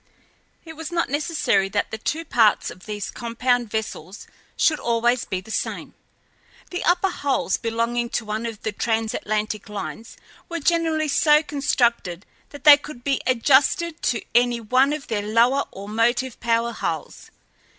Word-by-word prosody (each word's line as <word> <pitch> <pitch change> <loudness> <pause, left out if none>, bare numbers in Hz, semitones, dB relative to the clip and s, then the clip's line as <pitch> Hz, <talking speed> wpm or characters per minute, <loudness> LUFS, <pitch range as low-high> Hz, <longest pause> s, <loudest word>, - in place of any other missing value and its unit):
It 320 - -9
was 320 +1 -7
not 335 -5 -1
necessary 290 - +1
that 205 +1 -1
the 220 - -5
two 325 +8 -3
parts 225 -7 +3
of 185 - -14
these 210 -1 -4
compound 240 0 -1
vessels 205 -4 -5 0.3
should 310 -2 +3
always 235 +1 +1
be 185 -1 -3
the 220 - -12
same. - - -3 0.8
The 360 - -3
upper 365 +2 +2
hulls 280 -5 0
belonging 235 +1 -1
to 235 - -5
one 215 +2 -3
of 225 -2 -8
the 220 - -1
transatlantic 215 -1 -2
lines 215 +2 -7 0.3
were 335 -1 -3
generally 325 -1 +1
so 300 +1 +4
constructed 240 - 0 0.2
that 285 - -12
they 295 -2 +10
could 290 -4 -11
be 275 0 0
adjusted 280 +6 +2
to 245 -2 0
any 240 0 +3
one 255 +5 +2
of 300 -1 -4
their 215 -3 -2
lower 235 +6 +2
or 195 +1 -10
motive 240 +4 0
power 235 0 +1
hulls. - - -5
240 Hz, 155 wpm, -23 LUFS, 220-290 Hz, 0.8 s, they